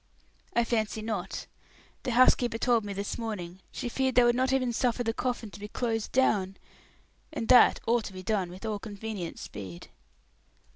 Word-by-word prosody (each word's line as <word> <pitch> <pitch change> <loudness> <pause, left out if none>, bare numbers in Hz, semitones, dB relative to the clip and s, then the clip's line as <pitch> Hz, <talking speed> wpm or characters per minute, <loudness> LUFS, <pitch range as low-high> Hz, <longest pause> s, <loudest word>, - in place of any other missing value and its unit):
"I 235 - +4
fancy 220 -2 -1
not. 205 -4 -3 0.6
The 250 - -2
housekeeper 245 -1 +4
told 235 -1 +2
me, 205 - -5
this 200 +3 -4
morning, 190 -6 -5
she - - -4
feared 260 +1 0
they 245 - +7
would 240 0 +4
not 260 +1 +2
even 255 -2 +1
suffer 245 0 +1
the 225 -1 0
coffin 245 -3 -2
to 205 - -10
be 205 - -6
closed 225 0 -2
down. 195 -7 +2 0.7
And 230 -7 -4
that 250 -1 +7
ought 230 -1 +2
to - - -7
be 185 0 -8
done 195 -3 0
with 185 +4 -9
all 215 -2 -2
convenient 205 -4 -6
speed." 95 -4 -8
225 Hz, 180 wpm, -29 LUFS, 200-240 Hz, 0.7 s, they